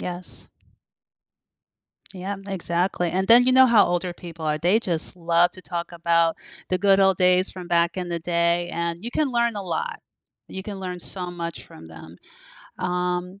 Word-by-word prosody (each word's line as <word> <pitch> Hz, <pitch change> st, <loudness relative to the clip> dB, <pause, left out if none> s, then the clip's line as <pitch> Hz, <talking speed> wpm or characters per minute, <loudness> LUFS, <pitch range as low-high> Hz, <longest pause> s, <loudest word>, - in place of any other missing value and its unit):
Yes. 180 Hz, 0 st, -7 dB, 1.7 s
Yeah, 190 Hz, +2 st, -5 dB
exactly, 175 Hz, -1 st, -1 dB
and 190 Hz, +3 st, -1 dB
then 240 Hz, +2 st, +8 dB
you 255 Hz, -, +4 dB
know 260 Hz, 0 st, +7 dB
how 230 Hz, -4 st, +6 dB
older 175 Hz, 0 st, -2 dB
people 165 Hz, -3 st, -8 dB
are, 150 Hz, -, +1 dB
they 180 Hz, +8 st, +2 dB
just 170 Hz, -5 st, -4 dB
love 170 Hz, 0 st, +2 dB
to 185 Hz, -, -11 dB
talk 175 Hz, -1 st, -5 dB
about 170 Hz, -1 st, +1 dB, 0.3 s
the 185 Hz, -, +1 dB
good 195 Hz, 0 st, +4 dB
old 190 Hz, -1 st, +3 dB
days 180 Hz, +1 st, +3 dB
from 180 Hz, -2 st, -9 dB
back 170 Hz, +1 st, +2 dB
in 180 Hz, -1 st, -4 dB
the 170 Hz, -1 st, -2 dB
day, 170 Hz, +1 st, 0 dB
and 170 Hz, +2 st, -3 dB
you 240 Hz, -, -4 dB
can 300 Hz, +3 st, 0 dB
learn 235 Hz, -3 st, 0 dB
a 200 Hz, -, -4 dB
lot. 465 Hz, -, -4 dB, 0.5 s
You 190 Hz, -, -7 dB
can 200 Hz, -1 st, -7 dB
learn 180 Hz, -1 st, -5 dB
so 180 Hz, 0 st, -6 dB
much 170 Hz, -1 st, -6 dB
from 80 Hz, -, -13 dB
them, 80 Hz, +1 st, -13 dB, 0.6 s
um, 180 Hz, +1 st, -2 dB
180 Hz, 180 wpm, -24 LUFS, 170-195 Hz, 1.7 s, then